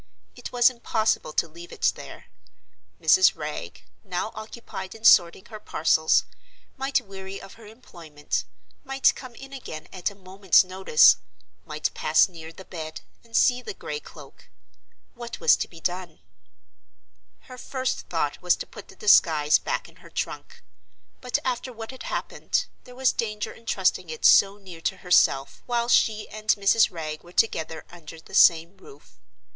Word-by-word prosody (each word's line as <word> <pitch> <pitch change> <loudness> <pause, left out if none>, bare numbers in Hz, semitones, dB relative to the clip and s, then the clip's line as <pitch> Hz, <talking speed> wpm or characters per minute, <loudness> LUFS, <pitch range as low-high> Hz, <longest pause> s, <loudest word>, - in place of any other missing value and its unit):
It - - -8
was 245 +1 +4
impossible 220 -7 -1
to 165 - +1
leave 170 +2 -13
it - - +1
there. - - -11 0.7
Mrs. 375 0 +5
Wragge - - -7 0.2
(now 195 +2 -3
occupied 215 -3 -8
in 225 0 -10
sorting 175 -1 +5
her 215 -2 -10
parcels) 160 -4 +2 0.5
might 270 +1 0
weary 195 -2 -9
of 195 - -12
her 225 -2 -15
employment, 170 -10 -6 0.4
might 270 -1 +2
come 255 -3 -11
in 270 +3 -12
again 160 - -8
at 185 -2 -2
a 200 - -15
moment's 190 -1 +3
notice, 185 - +5 0.5
might 150 0 -3
pass 155 - +3
near 165 -3 -11
the 190 +3 -13
bed, 160 -3 -7 0.2
and 230 -1 -3
see 250 0 +3
the 390 - -7
gray 450 - -5
cloak. - - -15 0.6
What 235 -1 -8
was 165 -2 +5
to - - -3
be 165 - -14
done? 180 -1 -4 1.2
Her 255 -1 -12
first 260 0 -4
thought - - -2
was - - +3
to - - -7
put - - -12
the 390 - -16
disguise 155 - +4
back - - -3
in - - -19
her - - -16
trunk. - - -6 0.6
But 250 -1 0
after 255 0 -2
what 225 0 -8
had 260 - -12
happened, - - -2 0.2
there 250 - -13
was 260 0 +2
danger 210 -2 -3
in 230 - -19
trusting 185 -3 0
it 155 - -5
so 200 0 +6
near 185 -5 -12
to - - -2
herself 140 -6 +2
while 235 -1 0
she 215 -3 +2
and 215 0 -10
Mrs. 205 +2 +4
Wragge 155 -2 -6
were 175 - -16
together 160 -6 -1
under 165 -2 -12
the - - -17
same 170 +3 +5
roof. 145 - -17
195 Hz, 165 wpm, -25 LUFS, 165-235 Hz, 1.2 s, so